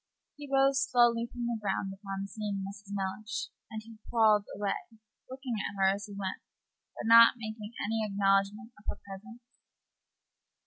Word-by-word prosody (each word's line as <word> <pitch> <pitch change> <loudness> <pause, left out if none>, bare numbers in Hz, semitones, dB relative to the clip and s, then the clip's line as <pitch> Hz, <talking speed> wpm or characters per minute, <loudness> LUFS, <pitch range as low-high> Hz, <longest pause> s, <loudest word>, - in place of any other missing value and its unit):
He 290 -1 -9
rose 270 0 +4
slowly 235 -1 +4
from 245 -1 -4
the 235 -1 -1
ground 195 -1 -1
upon 195 0 -5
seeing 200 -1 -4
Mrs. 200 0 -10
Mellish, 200 +3 -3 0.2
and 220 0 -9
crawled 215 -3 +4
away, 200 -1 -2 0.4
looking 260 -1 -5
at 205 - -3
her 195 0 +4
as 200 +1 -6
he 205 - -9
went, 195 -1 -4 0.5
but - - -6
not 230 +2 +9
making 220 -1 -6
any 225 +1 0
acknowledgment 200 +2 +1
of 210 - -22
her - - -3
presence. 220 +5 -10
210 Hz, 150 wpm, -31 LUFS, 195-230 Hz, 0.5 s, not